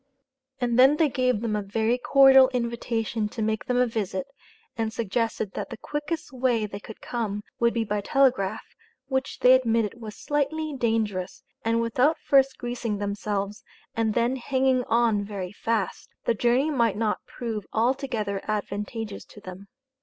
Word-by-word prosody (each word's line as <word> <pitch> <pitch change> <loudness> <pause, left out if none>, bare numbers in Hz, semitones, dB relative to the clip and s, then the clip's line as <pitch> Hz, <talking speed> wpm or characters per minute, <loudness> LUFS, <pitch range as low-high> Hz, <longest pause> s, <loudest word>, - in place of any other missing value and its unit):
And 245 -1 +1
then 270 +4 +7
they 315 -2 +3
gave 250 -4 +1
them 225 -2 -1
a 210 - 0
very 220 +4 0
cordial 270 0 +7
invitation 235 -2 -2
to 225 - -6
make 220 0 -1
them 250 - 0
a 250 - +4
visit, 205 -5 -3 0.5
and 225 -1 -1
suggested 225 -1 -2
that - - -5
the 235 - -7
quickest 295 +4 -4
way 245 -4 +1
they 200 -1 -7
could 220 +1 -11
come, 210 -4 -3 0.2
would 235 0 +3
be 230 -1 0
by 205 -1 -2
telegraph, 255 -4 +2 0.5
which 265 0 -2
they 250 - +7
admitted 230 -3 +1
was 215 -2 -7
slightly 295 +1 -1
dangerous, 225 -1 -1 0.2
and 230 +1 +1
without 250 +7 +2
first 270 -1 +3
greasing 240 -3 -3
themselves, 205 0 -3 0.3
and 220 -2 0
then 240 +2 +1
hanging 260 0 +1
on 225 -3 +2
very 195 -3 -5
fast, 215 -2 -2 0.2
the - - +3
journey 245 +7 +2
might 230 -7 +1
not 215 -1 -1
prove 225 -5 -5
altogether 230 -4 0
advantageous 210 +1 -4
to - - -14
them. 190 -1 -10
230 Hz, 160 wpm, -26 LUFS, 210-255 Hz, 0.5 s, then